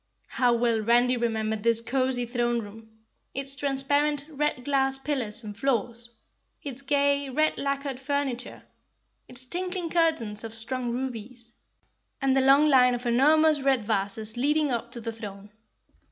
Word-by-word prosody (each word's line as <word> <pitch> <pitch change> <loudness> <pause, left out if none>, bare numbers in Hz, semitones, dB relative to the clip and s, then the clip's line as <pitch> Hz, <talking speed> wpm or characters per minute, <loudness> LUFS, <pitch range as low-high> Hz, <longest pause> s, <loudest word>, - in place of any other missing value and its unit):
How 250 -2 +2
well 230 -2 +1
Randy 240 +3 +3
remembered 220 -2 -1
this 230 +1 +4
cozy 255 +1 0
throne 240 0 0
room, 220 +1 -10 0.5
its 275 0 -3
transparent, 285 +2 0
red 295 -4 -2
glass 270 -1 +2
pillars 260 -6 -2
and 210 -1 -7
floors, 235 -1 -2 0.5
its 275 -2 -6
gay, 280 0 +1
red 310 +4 +1
lacquered 275 -1 -2
furniture, 270 -2 -3 0.6
its 250 +1 -2
tinkling 360 +2 -4
curtains 315 -12 +1
of 225 0 -7
strung 245 +2 -3
rubies, 240 -1 -6 0.7
and 270 -1 +2
the 270 - +4
long 275 +3 +5
line 250 -3 +5
of 245 +1 -7
enormous 300 +5 +4
red 265 -4 +2
vases 215 +1 -2
leading 295 +3 +1
up 235 0 -3
to 235 - -5
the 230 0 -4
throne. 205 -2 -9
255 Hz, 145 wpm, -26 LUFS, 230-280 Hz, 0.7 s, long